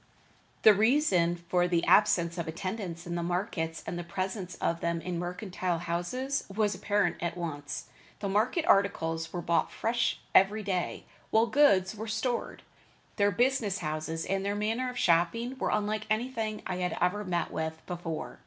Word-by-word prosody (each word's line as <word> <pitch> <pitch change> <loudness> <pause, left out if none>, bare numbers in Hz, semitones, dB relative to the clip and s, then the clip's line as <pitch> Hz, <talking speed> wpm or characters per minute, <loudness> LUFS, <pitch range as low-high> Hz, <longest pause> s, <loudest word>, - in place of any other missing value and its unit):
The 215 - +9
reason 205 - +3
for 175 +1 0
the 170 -1 +1
absence 175 -4 +4
of 170 - -3
attendants 175 0 -4
in 175 - -4
the 170 - -1
markets 170 -2 -2
and 175 - -4
the - - -4
presence 185 +1 -4
of 170 -1 -1
them 170 0 -1
in 175 0 -4
mercantile 180 0 -2
houses 175 +12 -2
was 210 +1 +1
apparent 205 -4 0
at 170 0 -2
once. 145 -4 -5 0.3
The 200 - -2
market 220 - +1
articles 165 -4 +2
were 175 -1 -4
brought 170 - +1
fresh 235 +1 0
every 205 +3 +5
day, 185 -3 -2 0.2
while 225 +1 +4
goods 225 -8 +4
were 215 +1 -6
stored. 235 +2 -2 0.5
Their 200 -1 +4
business 230 -1 +1
houses 155 0 -3
and 195 0 -1
their 200 +1 -1
manner 225 +5 -1
of 250 - -7
shopping 210 +8 +2
were - - 0
unlike 215 0 -1
anything 220 -1 -1
I 180 - -2
had 180 -1 -2
ever 205 +3 +1
met 175 -4 -1
with 160 0 -3
before. 175 -3 -5
185 Hz, 165 wpm, -29 LUFS, 170-215 Hz, 0.5 s, The